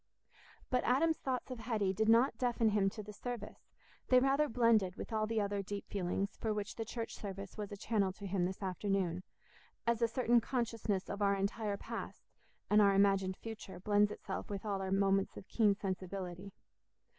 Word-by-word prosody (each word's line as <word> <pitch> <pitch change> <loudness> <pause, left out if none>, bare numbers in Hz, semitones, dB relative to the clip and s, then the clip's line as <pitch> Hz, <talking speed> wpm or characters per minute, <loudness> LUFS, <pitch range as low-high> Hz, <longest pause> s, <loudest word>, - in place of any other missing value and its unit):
But 250 -1 +2
Adam's 315 +6 +3
thoughts 260 0 -3
of 250 - -5
Hetty 215 -5 0
did 220 +3 +1
not 235 +4 +5
deafen 240 -3 +2
him 205 -2 +3
to 215 +2 -8
the 210 +1 -9
service; 235 -1 -7 0.4
they 255 - +6
rather 275 +3 +3
blended 225 -6 +3
with - - -7
all 215 0 +1
the 225 0 0
other 200 -1 0
deep 200 +1 -6
feelings 195 +1 -1
for 220 - -1
which 210 -1 -4
the 225 - -4
church 230 0 -5
service 195 -1 -7
was 210 -2 -5
a 205 - -6
channel 200 -2 +1
to 200 - -9
him 190 -2 0
this 190 +2 -4
afternoon, 185 -2 -1 0.6
as 235 0 +1
a 230 - +4
certain 240 0 +3
consciousness 230 -5 -1
of 200 - -5
our 200 -1 +3
entire 200 +1 -1
past - - -7 0.4
and 210 +1 +5
our 200 -1 +5
imagined 195 -1 +3
future 215 -5 -8
blends 205 +2 +3
itself 195 -2 -5
with 200 0 -5
all 200 -2 -1
our 190 - -3
moments 195 0 +2
of - - -10
keen 210 -3 +3
sensibility. 190 -1 -5
205 Hz, 190 wpm, -35 LUFS, 195-230 Hz, 0.6 s, they